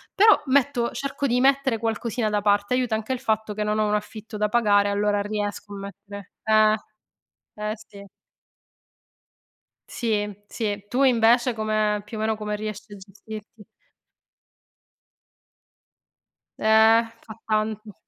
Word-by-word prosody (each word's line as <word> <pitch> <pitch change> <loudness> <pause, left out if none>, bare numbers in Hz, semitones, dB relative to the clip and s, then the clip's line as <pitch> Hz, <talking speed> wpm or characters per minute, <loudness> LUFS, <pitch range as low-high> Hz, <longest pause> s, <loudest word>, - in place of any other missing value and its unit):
Però 425 +1 +6
metto 265 -3 +2
cerco 275 0 -3
di 245 -1 +1
mettere 270 -2 +3
qualcosina 225 +1 -2
da 210 -1 0
parte, 205 +2 +2
aiuta 250 -3 +1
anche 220 +4 -3
il 255 - -4
fatto 220 -4 -1
che 210 - -5
non 210 0 0
ho 215 - +2
un 210 - 0
affitto 215 +1 -5
da 210 0 0
pagare 205 -3 +3
allora 205 0 +1
riesco 205 0 -4
a - - -6
mettere 200 0 -10
eh! 215 0 +4 0.8
Eh 210 0 -3
sì. 200 -2 -14 1.8
Sì, 210 -3 -2
sì, 205 -3 -4
tu 255 +5 +1
invece 240 0 +4
come 215 -1 0
più 215 +1 -8
o - - -5
meno 220 0 0
come 210 0 -4
riesci 215 -1 -7
a - - -8
gestirti? 210 +2 -11 2.9
Eh, 220 +1 +5 0.2
fa 220 - -9
tanto. 215 -1 -2
215 Hz, 135 wpm, -24 LUFS, 210-230 Hz, 2.9 s, Però